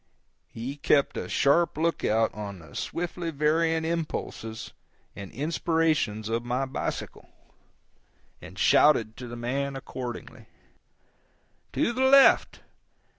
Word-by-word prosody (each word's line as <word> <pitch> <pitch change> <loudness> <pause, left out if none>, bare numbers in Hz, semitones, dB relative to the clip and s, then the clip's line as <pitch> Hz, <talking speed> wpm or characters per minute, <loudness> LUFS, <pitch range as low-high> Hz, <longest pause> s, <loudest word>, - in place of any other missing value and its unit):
He 130 +5 -6
kept 140 0 +2
a - - -4
sharp 150 +3 +2
lookout 115 -9 +1
on 100 -2 -6
the 80 -4 -15
swiftly 175 0 -4
varying 160 +2 +1
impulses 155 -9 -4 0.4
and 100 -1 -8
inspirations 155 -7 0
of 115 +1 -1
my 125 +2 -1
bicycle, 130 - -5 1.1
and - - -12
shouted 115 -7 +4
to 125 - -7
the 120 - -7
man 135 +4 -2
accordingly: 125 -2 -7 1.3
"To 235 - +1
the 260 +2 +1
left! 275 0 +5
140 Hz, 110 wpm, -27 LUFS, 115-165 Hz, 1.3 s, left